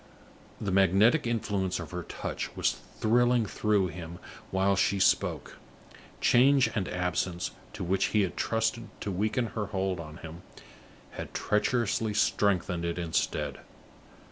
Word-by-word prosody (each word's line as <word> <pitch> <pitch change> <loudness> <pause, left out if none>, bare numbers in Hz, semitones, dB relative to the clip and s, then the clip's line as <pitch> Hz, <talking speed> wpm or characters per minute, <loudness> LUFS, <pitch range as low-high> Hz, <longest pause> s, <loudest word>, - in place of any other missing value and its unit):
The 100 - -2
magnetic 100 - +4
influence 100 -6 -1
of 85 - -7
her 90 0 -4
touch - - -5
was - - +2 0.3
thrilling 120 +1 +3
through 105 -2 +1
him 85 +1 -8 0.3
while 95 +1 +2
she 100 +1 +2
spoke. 95 - +1 0.6
Change 135 +2 +5
and 100 -4 -1
absence, 90 0 -1 0.2
to - - -5
which 95 +2 +1
he 105 -2 +2
had 90 -2 -3
trusted 115 +1 -1
to 100 - -3
weaken 110 +6 0
her 105 -3 -2
hold 95 -2 -2
on 80 -1 -8
him, 85 +1 -9 0.7
had - - -8
treacherously 110 0 0
strengthened 95 -5 +1
it 85 0 -2
instead. 85 -2 -1
95 Hz, 135 wpm, -29 LUFS, 90-110 Hz, 0.7 s, Change